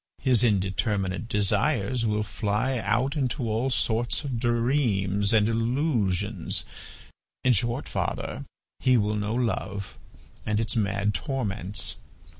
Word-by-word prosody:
His 125 -4 +5
indeterminate 95 0 0
desires 115 +2 +1
will 105 0 +1
fly 105 +5 -1
out 115 +7 0
into 130 -4 -1
all 115 +4 0
sorts 120 +1 +1
of 130 -5 -3
dreams 115 -5 +1
and 110 -2 +4
illusions; 115 - 0 0.8
in 130 - +5
short, 120 +5 -1
father, - - -3 0.3
he 130 -1 +4
will 105 -1 +1
know 105 +1 -1
love 100 -5 -2 0.4
and 105 0 0
its 110 +1 0
mad 100 -1 0
torments. 105 - -2
110 Hz, 115 wpm, -26 LUFS, 100-125 Hz, 0.8 s, His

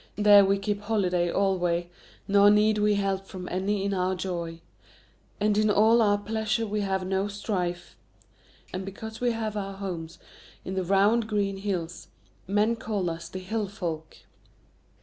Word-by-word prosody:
There 205 -1 +7
we 195 +1 +2
keep 205 0 -2
holiday 185 -5 0
alway, 175 -3 +1 0.4
nor 200 0 +6
need 210 +1 +4
we 210 0 +3
help 195 -1 -1
from 180 -1 -8
any 195 +2 -1
in 200 - 0
our 185 0 0
joy. 170 -3 -4 0.8
And 210 0 +2
in 215 0 +3
all 220 +3 +5
our 205 -2 +3
pleasure 220 +1 -1
we 210 0 -2
have 190 -2 -1
no 190 +1 0
strife. 185 -4 -3 0.8
And 185 - -3
because 220 +4 -8
we 245 - +2
have 225 -2 -3
our 195 -1 -3
homes 175 -5 -6 0.5
in 190 - -4
the 190 -1 -1
round 200 +5 +3
green 200 -2 -1
hills, 180 -4 -4 0.4
men 210 +4 +2
call 205 -6 -2
us 165 +1 -7
the - - -7
Hill 205 +3 -3
Folk." 170 -6 -5
200 Hz, 160 wpm, -27 LUFS, 185-210 Hz, 0.8 s, There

